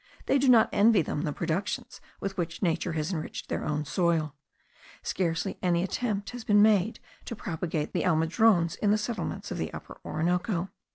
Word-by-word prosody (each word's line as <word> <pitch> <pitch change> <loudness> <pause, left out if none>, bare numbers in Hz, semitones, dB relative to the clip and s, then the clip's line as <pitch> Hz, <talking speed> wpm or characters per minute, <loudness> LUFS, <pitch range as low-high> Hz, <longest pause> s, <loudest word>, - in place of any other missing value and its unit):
They 275 - +3
do 270 0 +3
not 230 -3 +7
envy 210 -3 +5
them 150 - -3
the 155 - -1
productions 170 +5 -3 0.2
with 195 0 -4
which 170 0 -3
nature 170 0 0
has 155 +3 -2
enriched 155 -3 -5
their - - -2
own 150 0 -1
soil. 165 -2 +1 0.7
Scarcely 180 +1 -1
any 175 -1 +2
attempt 205 0 -2
has 245 -1 -7
been 205 -1 +5
made 215 -1 +3 0.3
to 235 - -5
propagate 160 -5 -3
the - - 0
almendrones 170 +2 +3
in 205 - +1
the 210 - +4
settlements 215 +1 -4
of - - -3
the - - -2
Upper - - -9
Orinoco. 180 +3 -1
180 Hz, 175 wpm, -28 LUFS, 165-210 Hz, 0.7 s, not